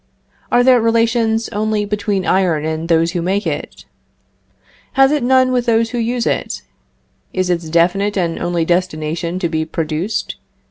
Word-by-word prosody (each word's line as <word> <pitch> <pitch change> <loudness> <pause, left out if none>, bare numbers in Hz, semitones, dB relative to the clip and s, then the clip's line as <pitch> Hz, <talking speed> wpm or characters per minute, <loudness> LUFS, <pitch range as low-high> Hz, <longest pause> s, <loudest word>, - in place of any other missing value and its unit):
Are 245 - +4
there 250 -2 +5
relations 230 0 +1
only 210 0 -1
between 205 -2 -1
iron 175 -5 +1
and 160 +1 -3
those 165 0 +3
who 175 - -2
make 195 +4 -1
it? - - -5 1.1
Has 270 +1 +5
it 300 -1 +1
none 255 +1 +3
with 250 -1 0
those 230 0 +2
who 245 - -2
use 235 +1 -1
it? - - -2 0.7
Is 185 -1 0
its 170 -2 -2
definite 190 +5 +1
and 170 -3 -1
only 175 -1 -1
destination 170 -1 -1
to 185 -2 -1
be 160 -1 -1
produced? 160 +5 -3
195 Hz, 155 wpm, -17 LUFS, 170-230 Hz, 1.1 s, there